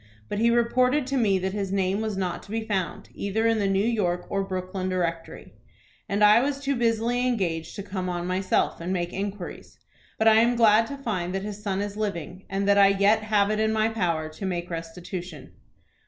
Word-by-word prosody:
But 205 - -2
he 230 +1 +4
reported 250 +4 +2
to 270 +1 -2
me 210 -7 +3
that 190 +1 -2
his 200 -2 -3
name 195 +1 0
was 215 -3 -3
not 180 -2 -2
to - - -17
be 225 +1 -2
found 190 -7 -3
either 210 +3 -1
in 225 -1 +3
the 200 - +1
New 195 +1 +1
York 185 -7 0
or 195 0 0
Brooklyn 185 0 -4
Directory, 170 -3 -3 0.6
and 205 +1 +1
I 210 +2 +7
was 275 +2 -1
too 280 0 -1
busily 235 +1 +1
engaged 175 -9 -2
to 200 - -5
come 185 -2 -4
on 175 -1 -3
myself, 185 -1 0
and 175 +2 -3
make 175 -2 -2
inquiries. 200 -1 -6 0.4
But 220 - +2
I 220 0 +7
am 235 +2 +4
glad 225 -1 +5
to 280 - -6
find 185 -9 -3
that 195 - -2
his 210 0 -6
son 200 -2 -2
is 205 0 -6
living, 190 -3 -4
and 195 +1 -1
that 200 0 +5
I 200 - +8
yet 200 +2 +3
have 210 -1 +2
it 215 - 0
in 220 0 +2
my 220 0 +2
power 170 -8 -1
to 155 +5 -10
make 180 -2 -3
restitution." 170 -1 -7
200 Hz, 215 wpm, -25 LUFS, 185-220 Hz, 0.6 s, I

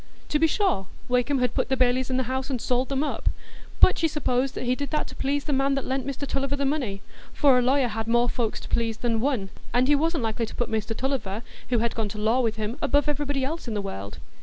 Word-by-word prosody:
To 300 - +2
be 325 - +5
sure, 310 - +1 0.2
Wakem 250 +3 +2
had 250 -1 +1
"put - - 0
the 265 - +1
bailies 255 0 +2
in 255 - +1
the 260 - +2
house, 260 +2 -3
and 260 -3 -1
sold 250 +2 0
them 275 +1 0
up"; - - -1 0.5
but - - +6
she 325 - +3
supposed 270 -3 0
he 250 0 +1
did 285 +2 -3
that 305 - 0
to - - -10
please 280 +1 -1
the 295 - -1
man 275 +1 +2
that 275 - -2
lent 265 0 -2
Mr 280 +1 -3
Tulliver 275 0 -1
the 280 0 -1
money, 250 -9 -1 0.3
for 270 -3 +5
a - - +3
lawyer 260 +1 +3
had 225 0 -3
more 240 +1 +3
folks 230 -2 -1
to - - -9
please 225 -1 0
than 230 -1 0
one, 230 -7 0 0.2
and 250 +1 +4
he 295 - +5
wasn't 320 -1 +1
likely 225 +1 -1
to - - -9
put 240 - -2
Mr 220 0 -1
Tulliver, 240 -6 -2 0.3
who 245 - +2
had 230 +1 0
gone 220 -2 -2
to 210 - -7
law 220 +4 +2
with 225 -3 +1
him, 220 +3 -3
above 290 -1 +2
everybody 285 -2 0
else 320 0 -4
in 225 - -3
the - - 0
world. 100 - -6
255 Hz, 260 wpm, -26 LUFS, 230-280 Hz, 0.5 s, but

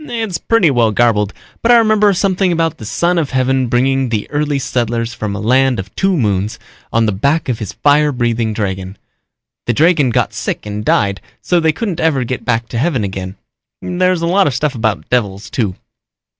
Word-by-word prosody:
"It's 225 - -3
pretty 205 -9 +3
well 120 -3 +3
garbled 105 -3 +2 0.3
but 235 - +3
I 240 - +8
remember 215 -2 +4
something 190 -1 +1
about 165 -2 -1
the 110 - -8
Son 175 +10 0
of 150 -4 -2
Heaven 130 -1 +1
bringing 130 +2 +1
the 110 -3 -2
early 145 -1 0
settlers 120 -3 -2
from 105 -3 -4
a - - -4
land 130 +4 +2
of 95 0 -7
two 190 -2 +1
moons 105 -2 0 0.3
on 115 0 +2
the 105 - +1
back 140 +11 0
of 125 -4 -2
his 105 - -5
fire 150 +1 +3
breathing 120 -3 -1
dragon. 95 -2 -4 0.7
The 120 - +2
dragon 155 0 +3
got 115 - 0
sick - - -4
and 105 0 -5
died 100 -4 +1 0.2
so 175 - +1
they 160 -1 +2
couldn't 185 -1 -4
ever 150 -5 +1
get 125 +1 -4
back 115 -2 -1
to 115 - -3
heaven 135 -5 0
again. 95 -1 -5 0.4
There's 180 -1 0
a - - +2
lot 190 +3 +3
of 135 - -1
stuff 150 -2 0
about 110 - -2
devils, 105 -5 -1
too." 105 -7 -1
130 Hz, 200 wpm, -16 LUFS, 110-165 Hz, 0.7 s, I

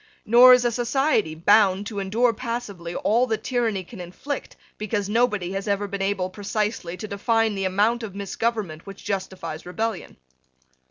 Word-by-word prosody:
Nor 245 +3 +8
is 250 -1 0
a 240 - +2
society 240 - +1
bound 200 +3 +4
to 205 -1 -5
endure 225 +5 +1
passively 215 -8 -5
all 235 +4 +2
that 220 -2 -2
tyranny 230 -6 -1
can 185 +2 -10
inflict, 220 +11 -6 0.2
because 210 -1 -2
nobody 210 -5 +1
has 195 +2 -4
ever 205 0 0
been 200 0 -5
able 195 -2 -1
precisely 205 -2 -3
to 215 - -6
define 225 +2 +1
the 195 -1 -2
amount 210 +6 +1
of 210 -4 -7
misgovernment 200 -4 -3
which 195 0 -10
justifies 185 -5 -4
rebellion. 220 +3 -4
205 Hz, 160 wpm, -24 LUFS, 190-230 Hz, 0.2 s, Nor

